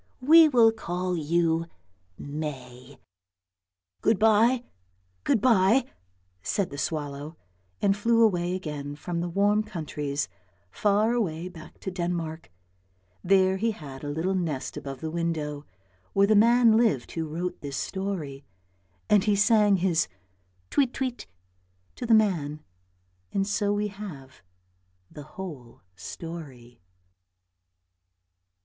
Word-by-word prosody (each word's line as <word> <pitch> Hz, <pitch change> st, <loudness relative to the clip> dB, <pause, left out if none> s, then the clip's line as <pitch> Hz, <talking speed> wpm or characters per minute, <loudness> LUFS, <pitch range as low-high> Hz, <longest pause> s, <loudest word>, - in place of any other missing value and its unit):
We 320 Hz, +3 st, +8 dB
will 235 Hz, -5 st, +6 dB
call 180 Hz, -4 st, -3 dB
you 165 Hz, +1 st, +1 dB, 0.5 s
May." 135 Hz, -3 st, -7 dB, 0.5 s
" 90 Hz, 0 st, -55 dB
Good 220 Hz, -, +3 dB
bye, 225 Hz, +4 st, +4 dB, 0.6 s
good -, -, +2 dB
bye," 230 Hz, +2 st, +4 dB, 0.6 s
said 175 Hz, -, -1 dB
the 140 Hz, -, -7 dB
swallow, 145 Hz, +1 st, -4 dB, 0.5 s
and 195 Hz, -1 st, +4 dB
flew 230 Hz, +2 st, +3 dB
away 180 Hz, -4 st, +2 dB
again 150 Hz, -5 st, -5 dB
from 170 Hz, +4 st, -4 dB
the 175 Hz, +1 st, -2 dB
warm 205 Hz, +4 st, +2 dB
countries, 150 Hz, -8 st, -4 dB, 0.4 s
far 210 Hz, -, +2 dB
away 180 Hz, -7 st, -2 dB
back 160 Hz, -3 st, -13 dB
to 190 Hz, -, -4 dB
Denmark; 170 Hz, -, -3 dB, 0.7 s
there 190 Hz, 0 st, +4 dB
he 225 Hz, +4 st, +1 dB
had 140 Hz, -8 st, -10 dB
a 145 Hz, -, -4 dB
little 160 Hz, +6 st, -1 dB
nest 165 Hz, -8 st, -2 dB
above 135 Hz, -2 st, -7 dB
the 160 Hz, -, -4 dB
window 155 Hz, -4 st, -3 dB, 0.5 s
where 200 Hz, 0 st, +5 dB
the 215 Hz, +1 st, +3 dB
man 230 Hz, +1 st, +6 dB
lived 220 Hz, -, +1 dB
who 165 Hz, -1 st, -3 dB
wrote 175 Hz, +4 st, -4 dB
this 140 Hz, -2 st, -5 dB
story, 180 Hz, -9 st, -4 dB, 0.6 s
and 205 Hz, -2 st, +4 dB
he 210 Hz, -1 st, +3 dB
sang 210 Hz, 0 st, +4 dB
his 175 Hz, -4 st, +1 dB, 0.3 s
" 90 Hz, 0 st, -41 dB
tweet, 265 Hz, -3 st, +2 dB
tweet 255 Hz, -2 st, -3 dB, 0.3 s
" 90 Hz, 0 st, -41 dB
to 240 Hz, -, -4 dB
the 225 Hz, -, +6 dB
man, 160 Hz, -9 st, +1 dB, 0.7 s
and 195 Hz, -, 0 dB
so 205 Hz, 0 st, 0 dB
we 205 Hz, 0 st, 0 dB
have 165 Hz, -11 st, -10 dB, 0.7 s
the 150 Hz, -, -9 dB, 0.2 s
whole 150 Hz, -11 st, -8 dB
story. 125 Hz, -, -9 dB
175 Hz, 130 wpm, -27 LUFS, 145-205 Hz, 0.7 s, We